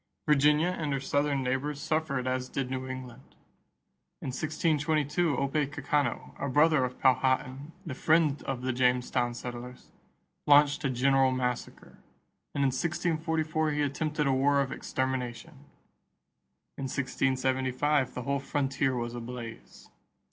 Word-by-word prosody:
Virginia 150 +3 +4
and 160 -5 -2
her 135 - 0
Southern 145 0 0
neighbors 135 +3 -1
suffered 150 -5 -1
as 130 0 -2
did 130 -2 -3
New 130 0 -3
England. 130 -1 -9 0.8
In - - -5
1622 155 +2 0
Opecacano, 145 0 -1
a 140 - -1
brother 150 0 +4
of 125 0 -4
Powhatan, 130 +2 +1
the 155 - -4
friend 155 +1 +2
of 130 -2 -3
the 130 0 0
Jamestown 125 -1 +1
settlers, 125 +1 -8 0.6
launched 145 0 +5
a 140 - +1
general 135 +1 +3
massacre; 125 -1 -4 0.6
and 140 - +1
in 135 - +4
1644 160 0 0
he 145 0 +1
attempted 150 +1 -1
a 135 - +2
war 140 +2 +3
of 135 -1 0
extermination. 130 +3 -4 1.1
In 135 - -3
1675 130 +1 0
the 125 - -4
whole 140 +1 0
frontier 135 -1 0
was 120 -1 -3
ablaze. 120 -1 -8
135 Hz, 125 wpm, -29 LUFS, 130-150 Hz, 1.1 s, launched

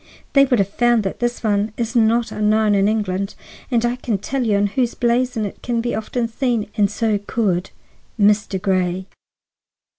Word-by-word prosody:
They 275 -1 +6
would 255 -2 +2
have 195 -3 +2
found 240 +2 +2
that 195 - -4
this 240 0 -2
one 210 0 0
is 230 0 -3
not 230 0 +3
unknown 215 0 +2
in 200 0 +3
England. 200 -2 -1 0.4
I 240 0 +1
can 235 -4 -2
tell 255 +7 -2
you 210 -3 +2
on 200 - +2
whose 240 +4 -1
blazon 240 -2 0
it 200 - -8
can 235 -1 -2
often 230 +2 -2
be 230 - -7
seen, 230 -4 -1
and 205 -2 +3
so 215 0 0
could—Mr. 205 0 -1
Grey." 185 -1 0
220 Hz, 170 wpm, -20 LUFS, 200-240 Hz, 0.4 s, They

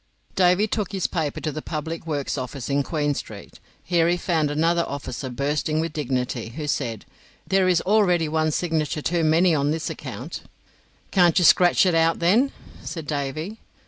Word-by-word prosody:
Davy 180 +2 +4
took 210 -1 -3
his 190 -2 -1
paper 155 -5 -2
to 155 - -2
the 155 +1 -5
Public 160 +2 -5
Works 145 -3 -2
office 130 0 -5
in 140 +1 +2
Queen 145 0 -1
Street. - - -9 0.2
Here 170 -2 +2
he 175 - +2
found 160 -4 0
another 165 +3 +2
officer 135 -2 -5
bursting 145 +4 -1
with 165 -1 -2
dignity, 125 -5 -2
who 155 -1 -4
said: 120 -7 -2 0.4
"There 190 -1 +2
is 180 -2 +3
already 180 -5 +3
one 155 0 +1
signature 155 -2 -1
too 170 -1 0
many 165 +3 +4
on 145 -1 +1
this 160 +1 -2
account." - - -7 0.7
"Can't 175 -4 +4
you 180 - +4
scratch 180 +2 +5
it 180 - +2
out, 165 0 +3
then?" 220 +11 +3 0.3
said 165 -3 -6
Davy. 155 +8 -4
160 Hz, 175 wpm, -23 LUFS, 145-175 Hz, 0.7 s, scratch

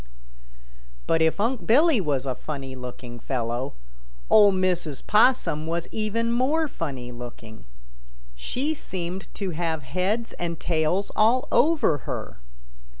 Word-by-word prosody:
But 165 - +2
if 160 +4 +2
Unc' 235 +3 -1
Billy 285 +1 +5
was 140 -5 -1
a 130 - -1
funny 135 -1 -6
looking 125 -1 -8
fellow, 120 +1 -3 0.6
Ol' 205 -2 +8
Mrs. 180 -6 0
Possum 210 - +3
was 170 +1 -2
even 225 +2 -1
more 285 +7 +2
funny 135 - -5
looking. 120 - -10 0.7
She 255 - -2
seemed 185 - -5
to 195 -3 -3
have 160 -2 -2
heads 185 - -1
and 170 -2 -3
tails 170 +4 0
all 230 +4 +3
over 300 - +3
her. - - -5
170 Hz, 125 wpm, -25 LUFS, 135-220 Hz, 0.7 s, Ol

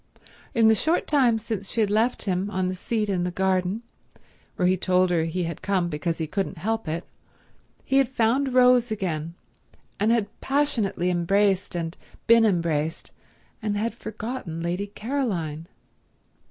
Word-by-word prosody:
In 225 -2 +5
the 220 - +7
short 320 - +1
time 255 -6 +3
since 215 -3 -5
she 235 - -3
had 210 -2 +2
left 225 +4 +1
him 190 0 -1
on 185 -2 -1
the - - -2
seat 210 +3 -2
in 185 -3 0
the 180 - 0
garden, 190 +3 0 0.7
where 180 - +2
he 185 - +4
told 185 0 +2
her 165 -2 +2
he 175 +2 -2
had 170 0 -5
come 185 -3 0
because 165 +2 -2
he 160 - -2
couldn't 190 +3 -3
help 225 +4 -2
it, 165 +2 -3 0.8
he 270 - +2
had 270 -3 +4
found 255 +2 +1
Rose 250 -1 +5
again, 170 -6 -3 0.6
had 220 +1 +3 0.2
passionately 240 -11 0
embraced 195 +2 +1
and 165 -1 -3 0.3
been 230 0 +6
embraced, 165 -5 0 0.5
and 210 -1 -1
had 225 +2 -1
forgotten 215 -6 -6
Lady 180 +4 -2
Caroline. 200 - -3
200 Hz, 155 wpm, -25 LUFS, 175-230 Hz, 0.8 s, the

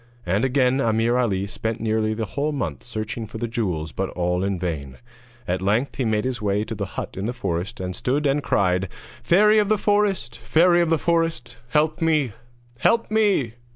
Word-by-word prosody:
And 95 +6 +1
again 130 0 +2
Ameer 115 +1 +2
Ali 100 -6 +1
spent 110 +2 -4
nearly 110 -1 0
the 110 0 -2
whole 140 +8 -2
month 80 - -4
searching 110 - -5
for 110 - -8
the 120 - -2
jewels, 90 - -2
but 95 +4 -2
all 90 +1 -1
in 100 -1 -1
vain. 75 -7 -4 0.5
At 90 +1 -1
length 110 +8 0
he 130 - 0
made 105 -1 +1
his 130 -3 -2
way 105 0 +1
to 110 - -6
the 100 -3 -4
hut - - -4
in 95 - -3
the 120 - -2
forest, 100 -1 -3
and 90 -1 -4
stood 140 +4 0
and 140 +1 +2
cried: 90 -6 +1 0.3
'Fairy 210 +4 +5
of 205 -1 +1
the 215 - +3
forest! 205 - 0
Fairy 175 +9 +4
of 170 - +1
the 165 - +3
forest! 165 -6 -1
Help 155 +3 +1
me! 155 -6 +2 0.5
help 230 -2 +2
me!' 200 - +2
115 Hz, 195 wpm, -23 LUFS, 100-150 Hz, 0.5 s, Fairy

